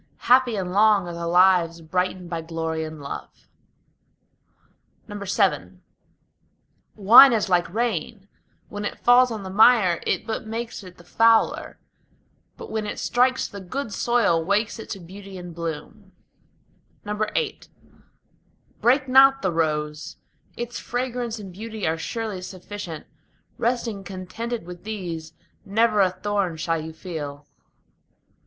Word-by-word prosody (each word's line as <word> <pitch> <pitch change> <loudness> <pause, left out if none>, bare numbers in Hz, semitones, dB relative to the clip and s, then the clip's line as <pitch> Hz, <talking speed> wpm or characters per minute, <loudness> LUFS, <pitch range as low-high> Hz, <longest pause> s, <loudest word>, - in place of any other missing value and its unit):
Happy 250 -2 +4
and 185 -3 -3
long 205 -2 +4
are 175 - -5
the 170 0 -4
lives 175 -1 +4
brightened 180 +2 -2
by 170 -1 -4
glory 160 -1 -3
and 155 -1 -7
love. 140 - -6 1.8
VII 195 - -1 1.2
Wine 235 +6 +9
is 215 -3 0
like 175 -2 +1
rain: 215 -2 -2 0.4
when 205 0 -6
it 205 - -4
falls 250 +1 +5
on 220 -3 -5
the 190 - -6
mire 205 -4 +5
it - - 0
but 220 -1 -4
makes 230 +1 -5
it 180 -1 -13
the 175 - -16
fouler, 225 +5 +2 0.8
But - - -9
when 220 -1 -2
it - - -5
strikes 255 +1 +1
the 200 - -9
good 230 +4 -5
soil 230 -9 +2
wakes 210 +6 0
it - - -9
to 195 - -5
beauty 190 +2 -11
and 175 -1 -9
bloom. 170 +5 -7 0.9
VIII 215 - -2 1.2
Break 260 +3 +3
not 270 +1 +6
the 190 - +1
rose; 150 -2 -2 0.4
its 240 0 -5
fragrance 245 -2 -3
and 195 -4 -9
beauty 220 +2 -6
are 160 +1 0
surely 220 0 -4
sufficient: 185 -3 -8 0.5
Resting 230 -4 -1
contented 195 +4 -6
with 175 0 -10
these, 175 -7 -6 0.3
never 215 +1 +2
a 190 - +4
thorn 185 -2 -2
shall 165 0 -1
you 160 +1 -7
feel. 150 -4 -7
195 Hz, 135 wpm, -24 LUFS, 170-225 Hz, 1.8 s, Wine